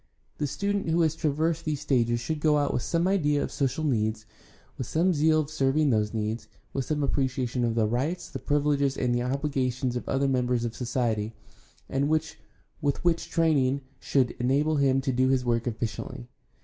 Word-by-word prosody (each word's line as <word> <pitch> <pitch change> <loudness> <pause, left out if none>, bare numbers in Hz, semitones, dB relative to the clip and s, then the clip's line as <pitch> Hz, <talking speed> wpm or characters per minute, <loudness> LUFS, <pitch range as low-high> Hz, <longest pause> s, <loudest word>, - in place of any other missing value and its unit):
The 145 - 0
student 200 +3 -1
who 165 +1 +3
has 160 -2 +3
traversed 160 +1 0
these 150 -3 -2
stages 120 -5 +1
should 155 +6 -3
go 150 0 +3
out 145 -1 +1
with - - 0
some 170 +7 0
idea 150 -7 +2
of - - -4
social 140 +3 -1
needs, 110 -6 0 0.5
with 130 - -5
some 180 +3 +2
zeal 155 0 +3
for 145 - -13
.serving 145 0 +2
those 105 -2 +1
needs, 110 +1 -3 0.3
with 135 -2 -1
some 150 -1 -1
appreciation 130 -3 0
of 115 -1 0
the 115 -2 +3
rights, 135 +11 -1
the - - -6
privileges, 145 -2 +1
and 125 -2 +1
the 120 - +1
obligations 130 -1 -1
of 120 - -4
other 135 +1 +1
members 125 -2 +1
of 115 0 -4
society, 115 -3 -1 0.5
and 140 +2 0
with 155 0 +1 1.0
training 150 -6 +3
which 140 - -7 0.2
should 130 -3 +1
enable 145 +5 +2
him 135 -1 +3
to 135 0 -1
do 130 +1 +2
his 130 -1 +2
work 120 0 0
efficiently. 110 - -4
135 Hz, 185 wpm, -27 LUFS, 120-150 Hz, 1.0 s, who